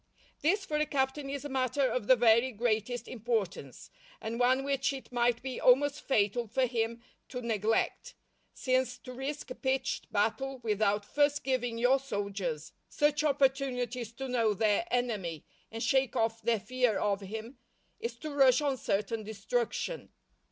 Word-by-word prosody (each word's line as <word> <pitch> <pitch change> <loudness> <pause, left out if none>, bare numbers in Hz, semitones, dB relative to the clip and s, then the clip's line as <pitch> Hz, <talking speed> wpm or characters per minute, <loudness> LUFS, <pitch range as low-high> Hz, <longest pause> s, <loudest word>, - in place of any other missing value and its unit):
This 385 +6 +2
for 300 -4 -1
a 305 0 +1
captain 275 0 -1
is 280 +1 -4
a - - -1
matter 265 +1 0
of 250 -4 -2
the 260 - +8
very 235 +2 +4
greatest 230 +1 -1
importance, 225 -5 -3 0.3
and 230 +2 -4
one 255 +2 +3
which 275 -1 0
it 265 -2 -9
might 240 0 +1
be 260 -1 -4
almost 275 +3 +4
fatal 230 -1 +1
for 255 +5 +1
him 230 -1 -2 0.3
to 250 - -5
neglect, 225 -2 -1 0.4
since 255 -1 0
to 255 - -10
risk 270 +1 -5
a - - -1
pitched 265 +1 -2
battle 255 +6 0
without 210 -1 +1
first 290 +4 +1
giving 245 -3 -1
your 250 +3 +4
soldiers 195 - -4 0.2
such 295 +1 +2
opportunities 265 -4 0
to 270 +3 -5
know 230 -4 +1
their 215 - +2
enemy 210 - -2 0.3
and 225 +1 -4
shake 270 -2 +2
off 225 0 0
their 230 0 +1
fear 245 +1 +1
of 205 -1 0
him, 225 +6 -7 0.4
is 235 0 -4
to 300 +6 -7
rush 270 -3 +5
on 285 -3 0
certain 210 0 -1
destruction. 220 - -3
245 Hz, 160 wpm, -31 LUFS, 220-270 Hz, 0.4 s, the